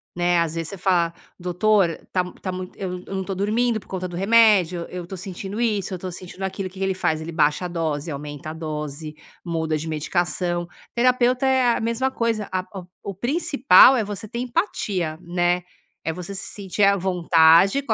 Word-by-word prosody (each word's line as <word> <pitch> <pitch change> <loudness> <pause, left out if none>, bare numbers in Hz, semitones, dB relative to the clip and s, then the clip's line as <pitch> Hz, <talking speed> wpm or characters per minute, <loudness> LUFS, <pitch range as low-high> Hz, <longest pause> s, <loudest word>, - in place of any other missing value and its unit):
Né, 175 0 +2
às 165 -1 -1
vezes 165 -1 -3
você 200 - -7
fala: 175 -3 +2 0.3
"Doutora, 180 0 +1
tá 185 -1 +2 0.2
tá 185 - -3
mui 185 0 -5
eu 190 - -4
num 180 0 -6
num 190 - -2
tô 195 0 -4
dormindo 220 +4 +1
por 200 - -20
conta 185 -1 -4
do 175 - -8
remédio, 195 -4 +4
eu 180 -1 -6
tô 190 - -6
sentindo 195 +4 -6
isso, 205 -4 0
eu 180 - -4
tô 185 0 -5
sentindo 180 +2 -10
aquilo." 190 0 -3
O - - -23
quê 190 - -12
que 195 - -1
ele 190 -1 0
faz? 160 -4 0
Ele 165 +1 -6
baixa 155 +2 +1
a - - -1
dose, 160 -2 -2
aumenta 145 +1 -6
a - - -7
dose, 155 -1 -5 0.3
muda 160 -2 -1
de 160 +2 -6
medicação. 175 +2 -1 0.3
Terapeuta 250 +1 +3
é 255 -3 +3
a - - -2
mesma 235 +4 0
coisa 225 -4 -1
a 185 0 0 0.2
o - - -7
o 180 - -16 0.2
o - - -11
principal 270 - +5
é 230 - +1
você 205 +1 -6
ter 235 +2 -5
empatia, 210 - -2
né. 175 0 0 0.4
É 165 - -1
você 180 +3 -7
se - - -5
sentir 200 0 -4
a 200 0 +5
vontade 175 +4 +4
com 225 - 0
185 Hz, 210 wpm, -23 LUFS, 170-215 Hz, 0.4 s, principal